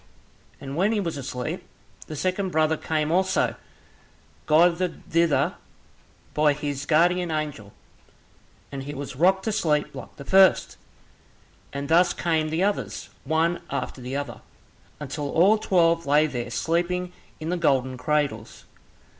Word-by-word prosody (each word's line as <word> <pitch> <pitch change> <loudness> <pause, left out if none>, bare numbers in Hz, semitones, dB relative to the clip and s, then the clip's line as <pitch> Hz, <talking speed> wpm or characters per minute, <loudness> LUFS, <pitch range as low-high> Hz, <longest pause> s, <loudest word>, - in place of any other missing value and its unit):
And 135 0 -7
when 195 +7 +2
he 215 - +1
was 170 -6 -2
asleep, 125 -2 -5 0.4
the 155 - -6
second 185 +5 -1
brother 160 -1 +2
came 155 0 -1
also, 190 +2 +2 0.9
guided 170 +3 +2
thither 160 -5 +2 0.8
by 150 -1 +3
his 145 -1 -4
guardian 175 +2 +3
angel, 150 -10 -4 1.0
and 140 - -5
he 145 +2 -7
was 140 -1 -6
rocked 190 +6 +3
to 220 - -1
sleep 155 -8 0
like - - -10
the 140 - -10
first, 190 +2 +4 1.0
and 140 0 -4
thus 175 +3 +4
came 160 -2 0
the 160 +4 0
others, 205 +1 -2 0.2
one 165 +2 +1
after 130 - -4
the 125 +2 -5
other, 145 0 -5 0.6
until 145 0 -4
all 195 +8 +4
twelve 170 -5 +2
lay 150 +2 +4
there 125 -5 -4
sleeping 175 +6 -1 0.3
in 155 - -5
the 180 - 0
golden 130 -6 +1
cradles. 140 -6 -2
155 Hz, 140 wpm, -25 LUFS, 145-175 Hz, 1.0 s, first